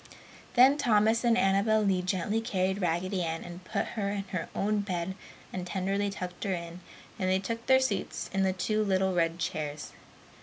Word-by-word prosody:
Then 265 Hz, +4 st, +6 dB
Thomas 220 Hz, -1 st, +3 dB
and 235 Hz, -1 st, +4 dB
Annabel 215 Hz, +1 st, +3 dB
Lee 190 Hz, -3 st, +2 dB
gently 190 Hz, +4 st, -1 dB
carried 190 Hz, -3 st, -1 dB
Raggedy 180 Hz, +2 st, 0 dB
Ann 165 Hz, -1 st, -2 dB
and 175 Hz, +1 st, -9 dB
put -, -, -2 dB
her 205 Hz, -3 st, -2 dB
in 200 Hz, -1 st, -2 dB
her 180 Hz, -4 st, -3 dB
own 210 Hz, +1 st, +1 dB
bed 185 Hz, -2 st, -2 dB, 0.4 s
and 180 Hz, -1 st, -4 dB
tenderly 195 Hz, +2 st, -1 dB
tucked 180 Hz, -3 st, -6 dB
her 195 Hz, -2 st, 0 dB
in, 170 Hz, 0 st, -7 dB, 0.4 s
and 185 Hz, -1 st, 0 dB
then 190 Hz, 0 st, +2 dB
took 230 Hz, +3 st, -3 dB
their 260 Hz, 0 st, +6 dB
seats 260 Hz, -7 st, -2 dB
in 195 Hz, -, +1 dB
the 190 Hz, -1 st, +3 dB
two 215 Hz, +4 st, 0 dB
little 190 Hz, -1 st, +1 dB
red 165 Hz, -1 st, +1 dB
chairs. 150 Hz, -3 st, -4 dB
190 Hz, 185 wpm, -29 LUFS, 180-210 Hz, 0.4 s, Then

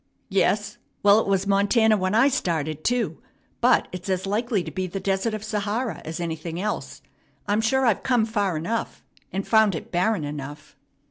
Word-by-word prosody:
"Yes? -, -, +1 dB, 0.2 s
Well, 205 Hz, +1 st, +7 dB
it -, -, -2 dB
was 195 Hz, -1 st, +1 dB
Montana 205 Hz, +3 st, +3 dB
when 185 Hz, 0 st, 0 dB
I 235 Hz, +5 st, +6 dB
started, 155 Hz, -, -1 dB
too; 245 Hz, -1 st, 0 dB, 0.4 s
but -, -, +4 dB
it's 180 Hz, +1 st, -7 dB
as 185 Hz, 0 st, 0 dB
likely 210 Hz, 0 st, 0 dB
to -, -, -7 dB
be 185 Hz, -1 st, -3 dB
the 195 Hz, +2 st, -5 dB
Desert 195 Hz, +3 st, 0 dB
of 215 Hz, -, -6 dB
Sahara 215 Hz, +2 st, -2 dB
as 160 Hz, +1 st, -5 dB
anything 165 Hz, 0 st, -4 dB
else. 210 Hz, +2 st, -4 dB, 0.4 s
I'm 205 Hz, +1 st, +1 dB
sure 265 Hz, +4 st, +2 dB
I've 230 Hz, -5 st, +2 dB
come 245 Hz, -4 st, +2 dB
far 205 Hz, -6 st, -1 dB
enough, 220 Hz, +9 st, -3 dB, 0.3 s
and 195 Hz, +1 st, -3 dB
found 220 Hz, -4 st, +4 dB
it -, -, -7 dB
barren 180 Hz, 0 st, +1 dB
enough." 145 Hz, 0 st, -7 dB
200 Hz, 180 wpm, -24 LUFS, 180-220 Hz, 0.4 s, Well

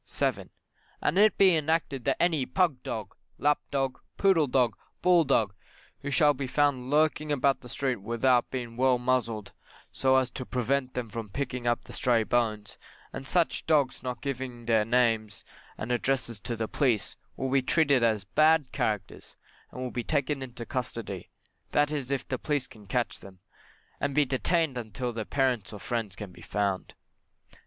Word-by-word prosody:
7. -, -, -1 dB, 0.5 s
And 150 Hz, -, 0 dB, 0.2 s
be 190 Hz, -2 st, +6 dB
it 160 Hz, -, +3 dB
enacted 155 Hz, -4 st, -1 dB
that -, -, +2 dB
any 165 Hz, -5 st, +2 dB
pug 170 Hz, -9 st, +1 dB
dog, 110 Hz, -5 st, -5 dB, 0.2 s
lap 145 Hz, 0 st, +2 dB
dog, 135 Hz, -2 st, -1 dB, 0.2 s
poodle 185 Hz, -7 st, +4 dB
dog, 125 Hz, -4 st, +2 dB, 0.3 s
bull 180 Hz, -2 st, +6 dB
dog, 110 Hz, -7 st, +2 dB, 0.5 s
who 140 Hz, -, -5 dB
shall 145 Hz, +2 st, +4 dB
be 135 Hz, -1 st, -4 dB
found 130 Hz, -2 st, +1 dB
lurking 150 Hz, 0 st, +2 dB
about 140 Hz, -1 st, +2 dB
the 125 Hz, -, -12 dB
street 130 Hz, 0 st, -1 dB
without 120 Hz, +4 st, +2 dB
being 120 Hz, -3 st, -5 dB
well 130 Hz, 0 st, +4 dB
muzzled, 120 Hz, -4 st, -1 dB, 0.4 s
so 130 Hz, 0 st, +2 dB
as 130 Hz, -1 st, +2 dB
to -, -, -5 dB
prevent 130 Hz, +1 st, -1 dB
them 125 Hz, -2 st, -2 dB
from 110 Hz, 0 st, -6 dB
picking 125 Hz, +1 st, -3 dB
up 120 Hz, 0 st, +1 dB
the -, -, -12 dB
stray 120 Hz, -3 st, +2 dB
bones; 110 Hz, -3 st, -1 dB, 0.3 s
and 135 Hz, 0 st, -6 dB
such 175 Hz, +1 st, +1 dB
dogs 145 Hz, -5 st, +2 dB
not 125 Hz, -1 st, -5 dB
giving 130 Hz, -3 st, -4 dB
their 110 Hz, -2 st, +3 dB
names 115 Hz, -3 st, +1 dB, 0.3 s
and 110 Hz, -, -4 dB
address 125 Hz, -2 st, 0 dB
to 115 Hz, +3 st, -4 dB
the 110 Hz, -1 st, -2 dB
police 125 Hz, -6 st, 0 dB, 0.2 s
will 130 Hz, 0 st, -2 dB
be 135 Hz, 0 st, +4 dB
treated 140 Hz, -1 st, +3 dB
as 110 Hz, -4 st, +2 dB
bad 155 Hz, +7 st, +3 dB
characters, 105 Hz, -7 st, -3 dB, 0.3 s
and 125 Hz, -, -8 dB
will 125 Hz, -, -4 dB
be 120 Hz, -, -3 dB
taken 145 Hz, -1 st, 0 dB
into 120 Hz, -2 st, -7 dB
custody, 115 Hz, -6 st, -4 dB, 0.4 s
that 145 Hz, 0 st, +3 dB
is 140 Hz, -4 st, -3 dB
if 140 Hz, -1 st, -2 dB
the 130 Hz, -, -2 dB
police 145 Hz, -4 st, -1 dB
can 105 Hz, -2 st, -16 dB
catch 120 Hz, +4 st, -1 dB
them 95 Hz, 0 st, -13 dB, 0.6 s
and 140 Hz, -1 st, -1 dB
be 150 Hz, -, +4 dB
detained 140 Hz, +1 st, 0 dB
until 120 Hz, +2 st, -4 dB
their 110 Hz, -1 st, -4 dB
parents 130 Hz, -6 st, 0 dB
or 105 Hz, -, -8 dB
friends 115 Hz, -5 st, -3 dB
can 100 Hz, -1 st, -8 dB
be -, -, -15 dB
found. 100 Hz, -2 st, -2 dB
125 Hz, 175 wpm, -28 LUFS, 115-140 Hz, 0.6 s, be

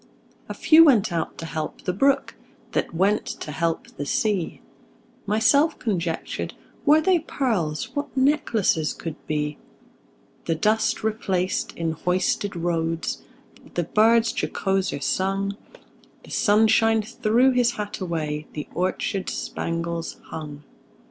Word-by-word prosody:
A -, -, -4 dB
few 325 Hz, +1 st, +7 dB
went 220 Hz, -, +4 dB
out 165 Hz, -2 st, -2 dB
to 165 Hz, -, -6 dB
help 155 Hz, -1 st, -5 dB
the 180 Hz, -, -1 dB
brook, 275 Hz, +8 st, +2 dB, 0.4 s
That -, -, -1 dB
went 195 Hz, +5 st, +2 dB, 0.2 s
to 150 Hz, -, -6 dB
help 165 Hz, +2 st, -1 dB
the 145 Hz, -, -3 dB
sea. 205 Hz, -2 st, 0 dB, 0.7 s
Myself 280 Hz, +9 st, +3 dB
conjectured, 175 Hz, -7 st, -3 dB, 0.3 s
Were 305 Hz, +2 st, +6 dB
they 360 Hz, +2 st, +3 dB
pearls, 215 Hz, -, -2 dB
What 285 Hz, -1 st, -4 dB
necklaces 230 Hz, -, +2 dB
could 165 Hz, -, -6 dB
be! 150 Hz, -1 st, -2 dB, 0.9 s
The 165 Hz, -, 0 dB
dust 215 Hz, +6 st, +1 dB
replaced 195 Hz, -4 st, -1 dB
in 165 Hz, -1 st, -1 dB
hoisted 185 Hz, +4 st, 0 dB
roads, 165 Hz, -1 st, -1 dB, 0.5 s
The 175 Hz, -, +1 dB
birds 225 Hz, +6 st, +3 dB
jocoser 195 Hz, -6 st, -1 dB
sung; 195 Hz, +3 st, 0 dB, 0.7 s
The -, -, -14 dB
sunshine 220 Hz, +1 st, +4 dB
threw 240 Hz, +3 st, +2 dB
his 245 Hz, -2 st, +2 dB
hat 210 Hz, -1 st, -5 dB
away, 155 Hz, -4 st, -3 dB
The 150 Hz, -, -5 dB
orchards 185 Hz, +2 st, -1 dB
spangles 170 Hz, 0 st, -3 dB
hung. 150 Hz, -2 st, -7 dB
195 Hz, 120 wpm, -24 LUFS, 165-225 Hz, 0.9 s, few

